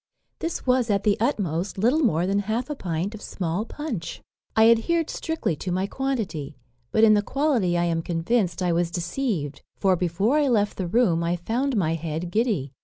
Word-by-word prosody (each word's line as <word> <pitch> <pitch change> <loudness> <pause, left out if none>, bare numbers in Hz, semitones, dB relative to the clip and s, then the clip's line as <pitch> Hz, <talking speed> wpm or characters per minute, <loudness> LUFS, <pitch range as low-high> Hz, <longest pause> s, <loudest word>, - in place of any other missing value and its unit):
This 330 0 -3
was, 250 -2 +2
at 200 -1 +1
the 210 -2 +3
utmost, 195 - -1
little 240 +10 +3
more 180 - +2
than 195 +2 +1
half 225 +7 -2
a - - -2
pint 180 - -3
of 215 - -9
small 180 +3 -3
punch. 235 - -5 0.4
"I 220 0 +6
adhered 325 +8 +1
strictly 320 - -2
to 180 - -4
my 185 +2 0
quantity; 200 - -3 0.3
but 220 - +3
in 215 -1 +7
the 205 - +4
quality 240 - +1
I 175 - +2
am 165 -1 0
convinced 175 +2 0
I 175 -1 +2
was 170 0 +1
deceived; 175 - -2 0.2
for 190 -2 +3
before 185 - +1
I 290 - +2
left 210 -5 +1
the 185 - -2
room 180 -5 +2
I 170 +1 +1
found 235 +8 -1
my 165 -5 +1
head 165 +1 -4
giddy. 210 - 0
200 Hz, 190 wpm, -25 LUFS, 170-240 Hz, 0.4 s, in